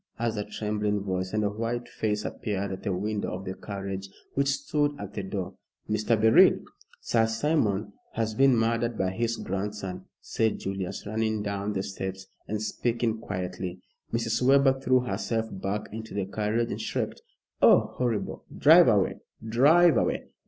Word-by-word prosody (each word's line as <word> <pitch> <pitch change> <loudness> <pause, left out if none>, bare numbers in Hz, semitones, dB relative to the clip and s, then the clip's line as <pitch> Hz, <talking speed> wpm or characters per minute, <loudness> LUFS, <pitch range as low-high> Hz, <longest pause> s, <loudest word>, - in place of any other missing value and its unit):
asked 115 -1 -1
a 105 - -1
trembling 105 -1 -2
voice, 95 -1 -2
and 110 0 0
a 100 - +2
white 115 +3 -3
face 105 -2 -2
appeared 100 -2 -3
at 95 - -5
the 100 - -2
window 105 +3 -2
of 95 +1 -7
the 95 - -3
carriage 95 -1 -6 0.2
which 140 0 +1
stood 145 +1 0
at 100 0 -7
the 100 - -3
door. 95 -1 -4 0.3
"Mr. 110 +1 +1
Beryl!" 110 +1 +6 0.4
"Sir 115 -1 +2
Simon 110 -5 0 0.2
has 110 -1 -1
been 135 +1 +4
murdered 115 0 0
by 95 -1 0
his 115 +3 -1
grandson," 95 -1 -4
said 110 -1 0
Julius, 95 -1 -4
running 110 0 -1
down 100 0 -2
the 95 -1 -1
steps 95 -1 -5 0.2
and 105 0 -2
speaking 115 +1 -1
quietly. 90 -2 -4 0.3
Mrs. 115 0 0
Webber 135 +1 +5
threw 130 -1 +3
herself 115 -2 -2
back 100 +2 -2
into 110 0 -7
the 100 -2 -1
carriage 110 +4 -1
and - - -4
shrieked, - - -3 0.4
"Oh, - - +5
horrible! 120 -4 -2
Drive - - +8
away - - +2 0.3
drive 145 +6 +5
away." - - 0
110 Hz, 160 wpm, -27 LUFS, 100-115 Hz, 0.4 s, Drive